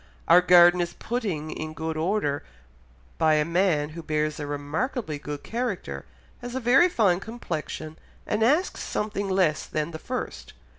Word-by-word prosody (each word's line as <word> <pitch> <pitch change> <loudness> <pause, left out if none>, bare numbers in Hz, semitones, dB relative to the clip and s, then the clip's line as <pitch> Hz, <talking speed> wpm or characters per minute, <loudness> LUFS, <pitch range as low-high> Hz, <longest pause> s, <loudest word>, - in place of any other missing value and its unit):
"Our 175 +2 +7
garden 175 0 +7
is 175 - -3
putting 195 -11 -3
in 155 0 -6
good 160 0 -3
order 160 -3 0 0.8
by 155 -1 +4
a 150 0 +2
man 165 -3 +1
who 165 +2 -8
bears 155 -1 -1
a 145 - -4
remarkably 150 - -3
good 145 0 -6
character, 200 - -4 0.4
has 245 0 -6
a - - 0
very 260 +9 +5
fine 200 - +2
complexion, 160 -7 -6 0.3
and 210 0 -1
asks 295 +11 +2
something 205 -2 -3
less 185 -5 +1
than 155 +2 -2
the 160 - -7
first. - - -5
170 Hz, 155 wpm, -26 LUFS, 155-215 Hz, 0.8 s, Our